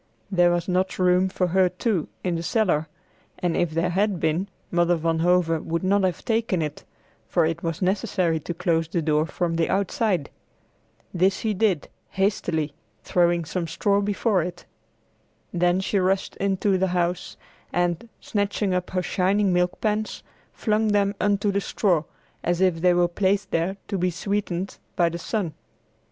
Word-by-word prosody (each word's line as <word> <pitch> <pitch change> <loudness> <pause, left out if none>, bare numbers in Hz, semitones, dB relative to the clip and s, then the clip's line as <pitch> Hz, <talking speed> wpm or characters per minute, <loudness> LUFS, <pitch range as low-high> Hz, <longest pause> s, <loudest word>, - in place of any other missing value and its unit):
There 175 -2 +4
was 175 0 0
not 185 +1 0
room 185 0 +3
for 185 0 0
her 185 +1 +4
too, 185 -1 -1 0.2
in 180 - 0
the 165 - -2
cellar, 170 -4 +1 0.5
and 175 -2 -1
if 175 - +1
there 165 +3 0
had 195 0 +1
been, 160 +5 0 0.2
Mother 175 0 +3
Van 165 0 0
Hove 170 -2 +2
would 170 +2 -2
not 200 +2 +3
have 185 -2 -1
taken 225 -7 +1
it, 150 -1 -5 0.4
for 170 -3 +2
it 165 +1 -2
was 165 +2 -3
necessary 185 -4 +1
to 175 - -5
close 165 -2 +1
the 165 0 -1
door 155 0 +2
from 170 -1 -1
the 165 - +1
outside. 195 - 0 0.8
This 185 +2 +3
she 220 -1 -1
did, 195 -6 +1 0.2
hastily, 175 -6 0 0.3
throwing 175 -1 +2
some 170 +2 -3
straw 200 +5 +1
before 205 -1 +1
it. 175 +1 -6 0.9
Then 175 +1 +2
she 195 +1 0
rushed 190 +1 0
into 195 0 +1
the 190 - +2
house 175 +1 -1 0.3
and, 175 +5 -1
snatching 205 -1 -1
up 180 0 -1
her 185 -1 -1
shining 190 +2 +2
milk 180 0 +1
pans, 215 0 -1 0.3
flung 215 0 0
them 205 -1 +2
upon 205 -1 +3
the 200 0 0
straw, 175 -6 +1 0.4
as 175 0 0
if 185 -3 +2
they 180 0 +4
were 175 0 +4
placed 195 +2 0
there 175 +4 0
to 195 - -2
be 180 +1 +2
sweetened 195 0 -3 0.2
by 175 -3 +3
the 170 +1 -5
sun. 180 -3 -2
180 Hz, 170 wpm, -24 LUFS, 170-195 Hz, 0.9 s, There